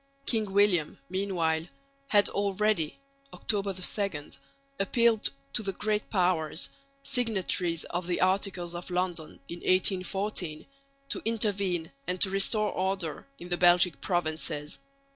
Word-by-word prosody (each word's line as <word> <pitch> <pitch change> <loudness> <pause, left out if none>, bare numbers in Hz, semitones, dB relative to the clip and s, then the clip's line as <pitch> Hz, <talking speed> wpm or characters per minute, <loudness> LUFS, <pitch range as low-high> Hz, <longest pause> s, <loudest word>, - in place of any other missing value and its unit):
King 215 -4 +1
William 195 -6 +3
meanwhile 175 -4 0 0.4
had 205 -4 +5
already 200 -4 0 0.4
(October 200 -2 0
2) 185 -4 -1 0.5
appealed 225 +2 +3 0.2
to - - +3
the 195 -2 -2
Great 210 +2 -1
Powers, 175 -5 +1 0.3
signatories 190 -9 0
of 175 0 -4
the 180 - 0
Articles 185 -2 +1
of 175 +1 -7
London 180 -3 -2
in 170 - -7
1814, 185 -3 0 0.4
to - - -2
intervene 200 -7 0 0.2
and 180 0 -1
to 190 - +4
restore 210 +2 +2
order 190 - -2
in 175 - -10
the 175 - 0
Belgic 175 -2 +5
provinces. 155 -4 -2
185 Hz, 120 wpm, -29 LUFS, 175-205 Hz, 0.5 s, had